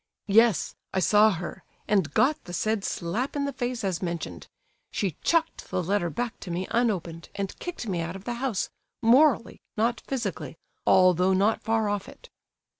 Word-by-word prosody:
"Yes, 225 -3 +4 0.2
I - - +3
saw 210 +3 +5
her, 185 0 -5 0.2
and 205 -3 +2
got 290 +3 +2
the 175 - -8
said 215 +3 0
slap 210 - -2
in 285 -1 0
the 280 - -3
face 245 -2 -3
as 185 -3 -1
mentioned. 170 -3 -4 0.4
She 190 -7 -2
chucked 330 -1 0
the 180 - -1
letter 190 0 0
back 235 +7 -4
to 185 - -8
me 175 +2 -2
unopened, 180 -9 -1
and 200 -1 -4
kicked 355 -8 -5
me 180 -4 -1
out 170 +2 -4
of 195 - -9
the 240 - -3
house, 250 -8 -1 0.3
morally, 245 +1 +4 0.2
not 230 +2 +1
physically, 230 -10 -4 0.3
although 185 0 +5
not 200 +4 +2
far 220 -1 +1
off 205 -1 -2
it." - - -15
205 Hz, 175 wpm, -27 LUFS, 185-240 Hz, 0.4 s, saw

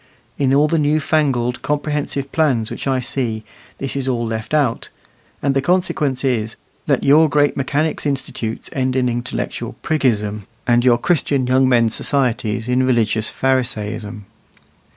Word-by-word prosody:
In 135 -2 +2
all 145 +2 +4
the 165 +1 +1
new 150 +1 +2
fangled 135 -6 0
comprehensive 145 -2 -2
plans 130 -9 +1
which - - -5
I 135 -1 +1
see, 115 -3 -2 0.3
this 135 0 -4
is 135 -1 -1
all 120 -2 0
left 110 -1 -4
out; 145 -7 0 0.5
and 140 0 +2
the 135 - +2
consequence 150 -5 +1
is, 115 -5 0 0.3
that - - +1
your 155 +3 +5
great 145 0 +2
mechanics' 145 +3 -1
institutes 125 -5 -3
end 130 -1 -1
in 130 -1 +2
intellectual 120 +1 -3
priggism, 105 -9 0 0.2
and 120 0 +3
your 120 -2 +5
Christian 140 -2 +1
young 130 +1 +3
men's 115 -3 +3
societies 115 -5 0
in 125 +1 +2
religious 115 -4 +1
Pharisaism. 110 -5 -2
130 Hz, 150 wpm, -19 LUFS, 115-145 Hz, 0.5 s, your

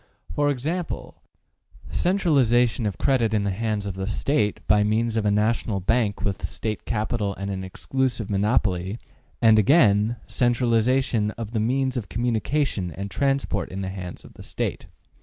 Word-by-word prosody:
For 145 0 +2
example, 160 +6 -3 0.7
``Centralization 125 - +2
of 100 - -4
credit 115 -5 +2
in 105 - +1
the 100 - 0
hands 105 0 -2
of 100 - -3
the 95 +1 -4
State, 110 -1 0
by 105 -1 +4
means 110 +2 +1
of 110 -2 +1
a - - +4
national 105 0 +1
bank 105 +2 0
with 100 -2 -2
State 110 -1 -4
capital 105 -2 -1
and 100 +1 -4
an 95 -1 -4
exclusive 120 +4 -2
monopoly;'' 100 -2 0 0.5
and 110 -1 +7
again, 105 - +4
``Centralization 120 -2 +1
of 115 -2 -5
the 115 - -1
means 130 +3 0
of 110 -5 -4
communication 120 -2 -1
and 100 +4 -6
transport 135 -7 0
in 95 +1 -5
the 95 - -3
hands 90 -2 -7
of - - -14
the - - -13
State.'' - - -4
110 Hz, 160 wpm, -24 LUFS, 100-125 Hz, 0.7 s, and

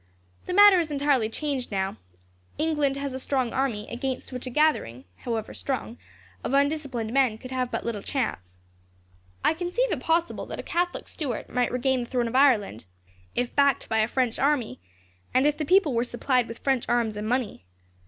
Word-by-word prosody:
The - - -3
matter 405 -2 +8
is 330 -2 -1
entirely 280 -6 +1
changed, 275 0 -3
now. 190 -1 -1 0.6
England 295 -3 +1
has 280 -1 -3
a 260 - -4
strong 260 -3 -1
army, 235 -6 -1
against 255 +2 -4
which 250 0 -6
a - - -2
gathering, 240 - +1
however 225 -2 -4
strong, 250 -3 -4 0.4
of - - -2
undisciplined 280 -5 0
men 260 -5 +3
could 255 +3 -10
have 255 -1 -1
but - - -4
little 225 -3 -3
chance. 90 - -3 0.9
I - - +5
conceive 360 +9 -1
it 315 - -1
possible 330 +5 0
that - - -6
a - - -5
Catholic 350 +1 -2
Stuart 270 -8 -4
might 250 -1 0
regain 255 +1 +1
the 240 - -10
throne 245 -2 0
of 230 - -5
Ireland, 235 - +3 0.5
if 245 -1 -2
backed 280 -2 +3
by 220 - +1
a 215 - +3
French 245 -1 0
army, 270 - +1 0.6
and 260 +2 +4
if 295 0 +3
the 305 - -3
people 360 -3 +4
were 235 0 +2
supplied 250 0 0
with 230 - -8
French 265 -3 0
arms 235 -3 +1
and 210 +1 -4
money. 240 - -2
260 Hz, 185 wpm, -26 LUFS, 235-290 Hz, 0.9 s, matter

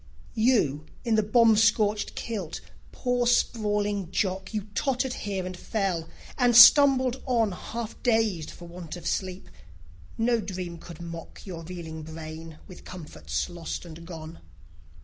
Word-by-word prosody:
You 205 - +2 0.2
in 230 - +1
the 215 - +4
bomb 225 +1 +5
scorched 210 -1 +2
kilt, 200 -9 -4 0.3
poor 245 -1 0
sprawling 205 -5 +1
Jock, 190 0 -1
You 215 -2 -2
tottered 265 +1 0
here 195 -5 -3
and 185 0 -5
fell, 180 -5 -2 0.3
and 245 -2 +4
stumbled 260 0 +8
on, 230 -5 +2
Half 225 +5 -6
dazed 220 -9 +1
for 175 - -11
want 170 -1 -8
of 175 - -10
sleep. 185 -1 -2 0.7
No 235 +1 +2
dream 180 -4 -6
could 170 -1 -11
mock 170 -1 -9
Your 175 -4 -6
reeling 165 -2 -7
brain 160 0 -8
with 185 - -12
comforts 175 -4 -5
lost 175 0 -6
and 165 0 -10
gone. 165 -1 -9
195 Hz, 140 wpm, -27 LUFS, 170-225 Hz, 0.7 s, stumbled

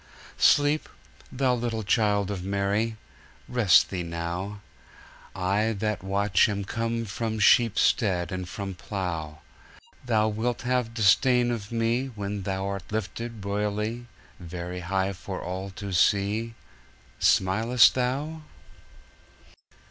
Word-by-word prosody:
Sleep, 145 +1 +4 0.4
Thou 130 -1 +1
little 115 -2 -2
Child 105 -2 +1
of 95 -3 -4
Mary; 100 +3 -1 0.5
Rest 120 -7 +4
Thee 90 -2 -2
now.I 95 +3 -4
that 105 0 -2
watch 100 +1 +2
am 100 -1 -3
come 115 +2 -2
from 110 +2 -3
sheep 115 +1 +4
stead 90 -6 +2
And 90 -1 -4
from 100 0 -5
plough. 85 -5 -5 0.6
Thou 110 -3 +2
wilt 115 +4 -2
have 125 -2 -1
disdain 120 +3 +4
of 110 -3 -4
meWhen 115 -4 -2
Thou'rt 95 0 -3
lifted, 110 +1 -4
royally, 105 +4 -2 0.3
Very 90 +1 -6
high 95 +2 -1
for 95 0 -6
all 95 +2 -5
to 100 -3 -5
see: 105 +5 +1 0.6
Smilest 110 +6 +4
Thou? 140 +6 -2
105 Hz, 110 wpm, -26 LUFS, 95-115 Hz, 0.6 s, Sleep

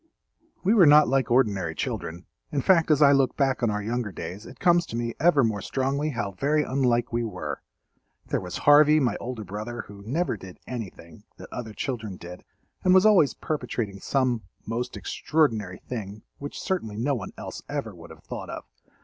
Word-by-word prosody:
We 195 +4 +4
were 190 -8 +7
not 150 +1 +7
like 135 -1 +1
ordinary 100 -9 +2
children—in 90 - -5
fact 165 +1 +4
as 150 -1 +5
I 140 - +7
look 135 -2 +2
back 135 -2 +1
on 120 - +2
our 105 0 -2
younger 115 -1 -2
days 95 +3 -7
it - - -13
comes 175 -1 +3
to - - -6
me 115 0 -2
ever 150 -3 +5
more 110 -3 0
strongly 140 +6 -1
how 115 -8 -3
very 145 +10 +1
unlike 125 -4 +1
we 120 0 +1
were. 105 -6 -5 0.6
There - - -1
was - - -5
Harvey, 150 +1 +7
my 125 -7 +1
older 120 -3 -5
brother, 105 +5 -5
who 100 -1 -12
never 135 - -1
did 95 -1 -11
anything 105 -4 -8
that - - -11
other 110 -3 -6
children 110 -6 -4
did 90 +1 -10 0.4
and 185 0 +5
was 190 +2 +6
always 195 -10 +5
perpetrating 120 -9 -3
some 125 0 0 0.2
most 120 +3 -3
extraordinary 110 - 0
thing 105 -3 -6 0.2
which 145 0 -6
certainly 115 - -2
no 135 +6 +1
one 105 -8 -4
else - - -7
ever - - -3
would - - -13
have - - -14
thought - - -7
of. - - -6
120 Hz, 185 wpm, -26 LUFS, 105-145 Hz, 0.6 s, were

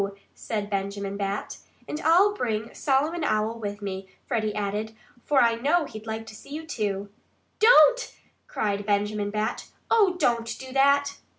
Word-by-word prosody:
said 210 -2 -4
Benjamin 200 0 -3
Bat. 200 0 -3 0.3
"And 300 - -4
I'll 365 +6 +5
bring 225 - -3
Solomon 300 +5 0
Owl 220 -3 0
with 205 -1 -5
me," 190 -1 -5 0.2
Freddie 220 -4 -1
added. 210 +2 -3 0.3
"For 275 -4 +4
I 230 -1 +4
know 295 +8 +1
he'd 215 -4 -10
like 220 0 -4
to 220 -1 -11
see 220 - -14
you, 310 +3 -6
too." 205 -7 -3 0.5
"Don't!" - - +6 0.4
cried 205 - -2
Benjamin 205 0 0
Bat. 215 +2 -2 0.2
"Oh, 410 -5 +4
don't 235 -7 0
do 260 -1 -9
that!" 280 +1 +3
225 Hz, 155 wpm, -26 LUFS, 205-285 Hz, 0.5 s, Don't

